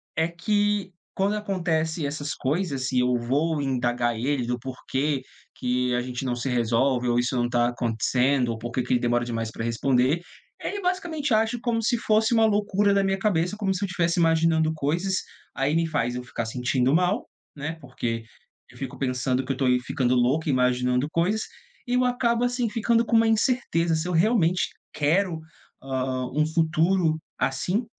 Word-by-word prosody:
é 160 - +2
que, 205 +2 0 0.2
quando 200 +2 0
acontece 170 -6 -1
essas 145 +1 -3
coisas, 140 -2 -1
se 130 - -1
eu 125 0 +2
vou 145 +6 0
indagar 120 -3 0
ele 130 0 -1
do 125 0 -1
porquê 135 +3 -2 0.3
que 125 0 0
a - - +1
gente 125 +1 -5
não 125 -2 -1
se 120 +2 -3
resolve, 125 +1 +1
ou 120 - +2
isso 125 +1 0
não 120 -1 +1
tá 120 0 +2
acontecendo, 125 +2 +1
ou 115 - -2
por 120 +1 -6
que 130 - 0
que 125 - -1
ele 120 - +2
demora 120 0 +1
demais 115 -2 -3
para 115 - -5
responder, 130 +6 +1 0.4
ele 405 0 -3
basicamente 345 - -1
age 225 +2 +2
como 230 -2 -1
se 240 +1 +2
fosse 220 +1 +2
uma 225 -1 +5
loucura 205 -1 +2
da 200 - +3
minha 195 0 0
cabeça, 190 -1 0
como 195 -2 0
se 190 - -3
eu - - +2
estivesse 175 -1 0
imaginando 165 -1 +3
coisas, 165 +6 -1 0.4
aí 135 +3 0
me 165 0 +2
faz 125 -6 -1
eu 125 - -4
ficar 115 -2 -4
sentindo 125 +4 +1
mal, 180 +5 +1 0.3
né, 155 +3 -5
porque 115 -4 -4 0.5
eu 125 - -16
fico 135 -1 -6
pensando 130 0 -1
que - - -2
eu 135 - -2
tô 135 - 0 0.2
ficando 125 -1 +1
louco, 130 +7 +2
imaginando 125 0 +1
coisas, 190 +6 +1 0.4
e 245 - -2
eu 250 0 +3
acabo, 245 -1 +1
assim, 245 -1 0
ficando 230 +2 +1
com 230 - +3
uma 225 0 +4
incerteza, 220 -8 +1
se 160 +2 -2
eu 180 - -2
realmente 180 -1 +2 0.2
quero, 165 +3 +1 0.4
hã, 130 -1 -2
um 155 +1 +2
futuro 160 +1 +2 0.2
assim, 180 - 0
155 Hz, 180 wpm, -25 LUFS, 125-195 Hz, 0.5 s, uma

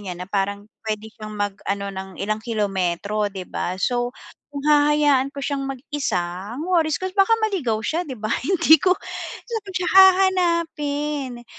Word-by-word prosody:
niya, 185 -3 -5
na 180 - -6
parang 200 +1 -1 0.2
puwede 215 0 -3
siyang 215 -1 -8
mag-ano 200 0 -2
ng 190 0 -6
ilang 215 +2 -2
kilometro, 205 -2 -1
'di 190 -2 -7
ba, 180 - -3
so 245 +1 0 0.4
kung 285 -1 -6
hahayaan 295 -2 +4
ko 280 - -7
siyang 280 -2 -2
mag-isa, 270 -6 -2 0.4
ang 310 - -4
worries 330 -4 +2
ko 375 - -6
baka 390 +3 +3
maligaw 280 - 0
siya 325 - 0
'di 260 - -5
ba, 215 +2 -2
hindi 320 0 +5
ko, 365 - +4 0.5
saan 435 -5 -5
siya 360 0 0
hahanapin. 325 -9 +3
270 Hz, 155 wpm, -22 LUFS, 210-320 Hz, 0.5 s, hindi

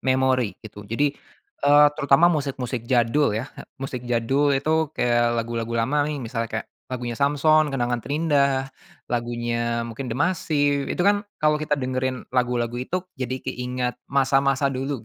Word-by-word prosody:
memori 130 -4 +1
gitu 105 -1 -10
jadi 140 +6 +1 0.5
eee, 145 +1 +6
terutama 145 +1 +4
musik-musik 130 -5 -3
jadul 120 0 +2
ya, 130 +6 -5 0.2
musik 135 -2 -5
jadul 125 +5 +2
itu 155 +3 +1
kayak 120 -1 +2
lagu-lagu 115 0 -2
lama 145 +3 +1
nih 150 - -3
misalnya 115 0 -3
kayak 110 -1 -4 0.2
lagunya 125 -2 -4
Samsons, 150 +2 +4
kenangan 120 -3 -1
terindah, 140 -2 +1 0.4
lagunya 120 0 -1
mungkin 120 +3 -6
dMasiv 145 0 0
itu - - -1
kan 205 0 +4 0.2
kalau 150 0 +2
kita 150 -1 0
dengerin 130 -1 -2
lagu-lagu 120 -2 0
itu, 180 +8 -3
jadi 130 -2 -5
keingat 125 0 -3
masa-masa 135 0 +2
dulu 130 -2 -3
130 Hz, 140 wpm, -24 LUFS, 120-145 Hz, 0.5 s, eee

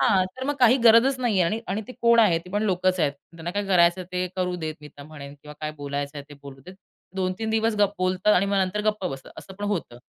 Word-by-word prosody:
हां, 190 -2 +3
तर 260 - -5
मग 290 +2 -1
काही 245 +1 +6
गरजच 235 +4 +6
नाहीये 215 -7 +2
आणि 215 +7 -1
आणि 200 +4 -2
ते - - -7
कोण 235 0 +5
आहे? 180 -7 +4
ती 180 +2 -14
पण 205 +2 -1
लोकच 185 -2 +1
आहेत. 145 -3 +2 0.2
त्यांना 165 +1 -6
काय 205 +2 -2
करायचंय 180 -1 +3
ते 180 0 -1
करू 180 -1 -1
देत 160 -2 -4
मी 150 - -11
तर 145 - -14
म्हणेन 140 -1 -11
किंवा 150 0 -11
काय 155 0 -3
बोलायचंय 145 +1 -4
ते 145 - -12
बोलू 135 -1 -11
देत. 185 - -10 0.4
2-3 190 +4 -2
दिवस 225 0 +1
गप 205 -1 +3
बोलतात 185 +3 +2
आणि 185 +2 +2
मग 200 0 0
नंतर 190 +3 -2
गप्प 210 -2 -2
बसतात. 135 -4 -8
असं 190 - -11
पण 205 +2 -6
होतं. 180 -12 -3
185 Hz, 250 wpm, -24 LUFS, 160-210 Hz, 0.4 s, काही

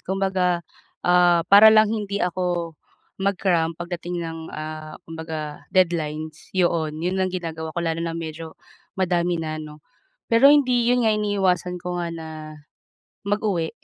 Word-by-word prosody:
Kumbaga, 185 -2 0 0.4
ah, 175 -1 +4
para 205 +4 +8
lang 215 0 +5
hindi 200 -4 -2
ako 175 -2 -2 0.5
mag-cram 180 -4 +1
pagdating 175 0 -5
ng, 165 0 -6
ah, 155 0 -7
kumbaga 160 -2 -6
deadlines 160 -4 -1
yoon 165 -4 +1
'yon 190 +1 0
ang 185 - +1
ginagawa 165 -3 -5
ko - - +1
lalo 165 0 -1
na 165 0 -3
medyo 160 0 -7 0.4
madami 175 -2 +1
na 155 -1 -4
'no. 150 -1 -11 0.5
Pero 230 +5 +7
hindi 255 -5 +4
'yon 245 -1 +3
nga 220 - +4
iniiwasan 190 -4 0
ko 180 0 -4
nga 170 - -2
na 165 -1 -7 0.9
mag-uwi 200 -5 -1
175 Hz, 140 wpm, -23 LUFS, 160-190 Hz, 0.9 s, para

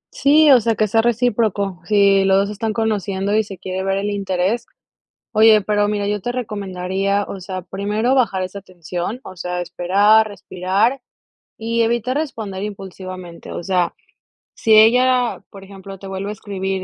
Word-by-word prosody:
Sí, 300 +1 +5
o 250 -4 +7
sea, 230 0 +1
que 215 0 +1
sea 225 +3 +2
recíproco, 215 -5 0
si 200 -2 +4
los 195 0 +3
2 200 +1 +2
se - - -5
están 220 +1 -2
conociendo 205 -2 -1
y 220 - +3
se 195 -3 -10
quiere 185 +1 -4
ver 195 0 0
el 205 +1 -2
interés. 195 +2 -1 0.7
Oye, 220 0 +6
pero 205 0 +1
mira, 205 -1 -1
yo 205 -1 -2
te 245 - -2
recomendaría, 200 -3 -2
o 195 - -7
sea, 185 0 -5
primero 205 +7 -1
bajar 210 -8 +1
esa 190 +2 -7
tensión, 180 +5 -6
o 185 - -9
sea, 180 +1 -4
esperar, 200 +5 +3
respirar 200 +5 -1 0.6
y 230 +1 0
evitar 235 +3 0
responder 220 -11 -4
impulsivamente, 185 -3 -8
o - - -5
sea, 180 -2 0 0.6
si 220 -1 +3
ella, 250 +2 +4
por 195 -2 -12
ejemplo, 195 0 -11
te 195 - -10
vuelve 195 +1 -5
a 210 - -3
escribir 190 -2 -4
200 Hz, 170 wpm, -19 LUFS, 190-220 Hz, 0.7 s, o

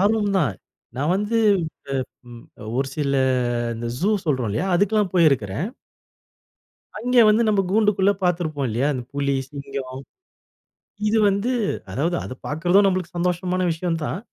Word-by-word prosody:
ஆர்வம் 205 0 +2
தான். 140 - +1 0.4
நான் 150 +6 +1
வந்து 210 +3 -1 0.9
அ - - -13
ம் 120 -1 -11 0.2
அ - - -8
ஒரு 135 0 0
சில 140 -2 0 0.6
இந்த 115 +1 -5
"ஜு" 195 +8 +1
சொல்றோம் 130 -8 0
இல்லையா, 110 - -1
அதுக்கெல்லாம் 205 +1 +2
போயிருக்கிறேன். 140 - +2 1.3
அங்கே 245 +2 +3
வந்து 215 +2 +4
நம்ப 205 -2 +3
கூண்டுக்குள்ள 205 -1 +3
பார்த்திருப்போம் 160 -6 0
இல்லையா? 120 +6 0
அந்த 130 -3 -4
புலி, 140 -1 0 0.2
சிங்கம். 140 -2 -6 1.1
இது 220 +1 +2
வந்து 200 +5 0 0.4
அதாவது 165 - 0
அத - - -6
பார்க்கறதும் 175 +6 +3
நம்மளுக்கு 185 -3 -1
சந்தோஷமான 180 +1 0
விஷயம் 165 0 -2
தான். 160 - -3
175 Hz, 140 wpm, -22 LUFS, 140-200 Hz, 1.3 s, வந்து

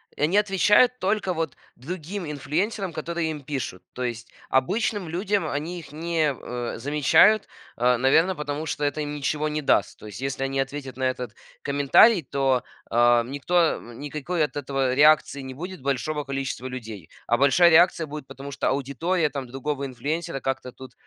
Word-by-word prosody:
и - - -8
они 165 +6 +2
отвечают 210 +5 +4
только 195 -1 0
вот 160 -4 -3 0.2
другим 175 +7 -6
инфлюенсерам, 175 +8 -2
которые 165 +1 -3
им 150 - -6
пишут. 130 -10 -4
То 125 - -4
есть 120 -1 -4 0.2
обычным 190 - 0
людям 195 +5 -1
они 165 +5 -3
их 160 - -12
не, 160 -2 0
э, 120 -2 -5
замечают, 150 - +4 0.3
э, 125 +1 +3
наверно, 160 +9 +3
потому 150 0 -4
что 150 0 -3
это 145 +1 0
им 145 0 -4
ничего 150 +1 -1
не 150 0 -2
даст. 105 -9 +1
То - - -12
есть 105 - -9
если 135 0 -3
они 135 0 -1
ответят 135 -1 -4
на 130 - -4
этот 125 -3 -2 0.3
комментарий, 145 - +5
то, 135 -3 0 0.3
о, 120 0 +5
м, 120 +3 -8
никто, 145 +5 -3 0.2
м, 120 0 -12
никакой 150 +3 -2
от - - -10
этого 135 -2 -1
реакции 150 -1 +4
не 130 -1 -7
будет 180 +3 -7
большого 140 +3 -1
количества 135 -2 -4
людей. 110 -9 -8 0.2
А 120 - +3
большая 140 +6 +5
реакция 165 -1 +4
будет, 150 -2 -8
потому 140 +1 -9
что - - -2
аудитория 150 +5 0
там 135 -1 -5
другого 135 +3 -3
инфлюенсера 145 +3 -3
как-то 130 -1 -3
тут, 130 -1 -12
145 Hz, 175 wpm, -25 LUFS, 130-165 Hz, 0.3 s, комментарий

